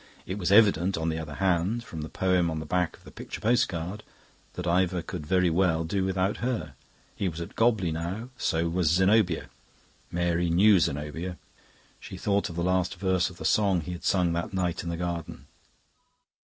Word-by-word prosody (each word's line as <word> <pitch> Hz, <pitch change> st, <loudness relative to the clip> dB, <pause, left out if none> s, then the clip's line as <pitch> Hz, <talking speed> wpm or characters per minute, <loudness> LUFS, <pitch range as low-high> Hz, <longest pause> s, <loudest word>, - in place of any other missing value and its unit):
It 95 Hz, +3 st, -4 dB
was 90 Hz, 0 st, 0 dB
evident, 100 Hz, -4 st, +5 dB
on 80 Hz, 0 st, -1 dB
the 80 Hz, 0 st, -2 dB
other 75 Hz, -2 st, -6 dB
hand, 95 Hz, +6 st, +1 dB
from 80 Hz, -8 st, -7 dB
the 75 Hz, -, -6 dB
poem 90 Hz, -2 st, +1 dB
on 80 Hz, -, -3 dB
the 80 Hz, -, -6 dB
back 90 Hz, +2 st, -1 dB
of -, -, -24 dB
the -, -, -13 dB
picture -, -, -8 dB
postcard, 105 Hz, -5 st, 0 dB, 0.5 s
that 90 Hz, -, -5 dB
Ivor 90 Hz, 0 st, +1 dB
could 75 Hz, -, -6 dB
very 90 Hz, -1 st, +3 dB
well 80 Hz, -2 st, +2 dB
do 95 Hz, +4 st, -1 dB
without 95 Hz, +1 st, 0 dB
her. 105 Hz, -, -3 dB, 0.4 s
He 95 Hz, -, -1 dB
was 80 Hz, 0 st, -7 dB
at 85 Hz, -, -7 dB
Gobley 110 Hz, -7 st, +2 dB
now, 90 Hz, +9 st, -4 dB
so 85 Hz, -8 st, 0 dB
was 85 Hz, -1 st, +1 dB
Zenobia. 95 Hz, 0 st, +2 dB, 0.6 s
Mary 85 Hz, 0 st, 0 dB
knew 95 Hz, +4 st, +5 dB
Zenobia. 80 Hz, +4 st, -2 dB, 0.6 s
She 95 Hz, -, -9 dB
thought 100 Hz, +1 st, 0 dB
of 85 Hz, -, -8 dB
the 85 Hz, -, -1 dB
last 90 Hz, 0 st, +1 dB
verse 95 Hz, -1 st, +1 dB
of 90 Hz, -, -14 dB
the -, -, -7 dB
song 100 Hz, -5 st, +3 dB
he 85 Hz, -, -6 dB
had 90 Hz, -, -7 dB
sung 90 Hz, -3 st, +2 dB
that 85 Hz, +2 st, -3 dB
night 90 Hz, -2 st, -1 dB
in 85 Hz, -, -5 dB
the 85 Hz, -, -3 dB
garden. 85 Hz, -1 st, -4 dB
90 Hz, 195 wpm, -27 LUFS, 85-95 Hz, 0.6 s, evident